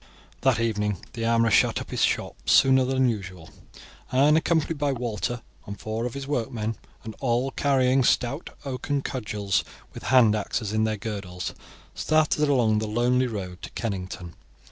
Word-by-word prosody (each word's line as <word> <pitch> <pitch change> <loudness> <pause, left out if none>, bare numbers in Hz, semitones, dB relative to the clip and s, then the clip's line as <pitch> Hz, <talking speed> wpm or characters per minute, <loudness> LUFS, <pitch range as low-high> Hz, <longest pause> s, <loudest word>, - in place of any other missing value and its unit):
That 130 -3 +3
evening 105 -3 0 0.2
the 115 -2 -3
armourer 115 -1 +3
shut - - +4
up - - -8
his - - -2
shop - - +1
sooner 130 -1 +5
than 130 0 +2
usual, 95 -7 -5 0.6
and 140 +4 +5
accompanied 160 -1 +1
by 145 -2 +1
Walter 120 -1 -3 0.2
and 100 -1 -7
four 110 +2 -3
of 125 - -8
his 140 -1 -5
workmen, 115 -5 -2 0.3
and 110 - -7
all 125 +1 0
carrying 130 -2 +2
stout 125 +6 +1 0.2
oaken 140 +1 -2
cudgels, 105 -5 -1 0.3
with - - -8
hand 120 -5 +5
axes 105 0 -2
in 110 0 +2
their 110 -1 -1
girdles, 100 -5 -5 0.4
started 155 -1 +2
along 115 -6 +3
the 110 - -2
lonely 125 +3 +2
road 95 -6 -6
to - - -7
Kennington. 90 -5 -4
115 Hz, 160 wpm, -25 LUFS, 105-130 Hz, 0.6 s, sooner